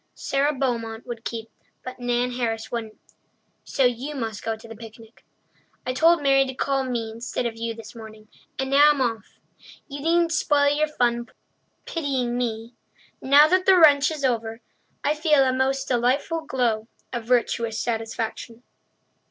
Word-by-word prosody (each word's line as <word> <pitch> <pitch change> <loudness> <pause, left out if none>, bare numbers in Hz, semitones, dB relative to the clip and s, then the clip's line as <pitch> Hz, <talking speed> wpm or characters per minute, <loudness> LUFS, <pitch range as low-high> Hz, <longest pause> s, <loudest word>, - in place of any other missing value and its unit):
Sara 275 +2 0
Beaumont 235 -5 -3
would 235 -2 -7
keep, 225 -1 -6 0.3
but 255 0 -8
Nan 245 0 0
Harris 230 -3 -3
wouldn't, 225 -2 -5 0.7
so 270 - 0
you 250 +5 -1
must 225 -5 -4
go 225 0 -2
to 220 +1 -14
the 225 - -10
picnic. 225 +1 -14 0.6
I 255 - -1
told 330 +4 +4
Mary 270 -1 +5
to 260 - -6
call 275 0 0
me 235 -3 -3
instead 235 +2 -4
of 230 -1 -3
you 230 0 -4
this 220 -1 -11
morning, 220 -2 -12 0.3
and 265 0 -3
now 290 +2 +7
I'm 295 -2 +2
off. 230 -5 -3 0.5
You 285 -1 -7
needn't 335 +2 +2
spoil 290 -2 +2
your 305 +1 +1
fun 240 -5 -1 0.6
pitying 265 -7 -2
me. 230 -1 -3 0.5
Now 285 +3 +6
that 370 0 +2
the 380 -1 +7
wrench 290 -4 +6
is 305 -4 -3
over, 225 -2 -1 0.4
I 295 - +2
feel 305 -2 +3
a 260 -1 +1
most 265 +1 0
delightful 265 +6 0
glow 230 -5 0 0.3
of 240 -2 -4
virtuous 235 -2 0
satisfaction! 225 0 -4
245 Hz, 160 wpm, -24 LUFS, 230-280 Hz, 0.7 s, now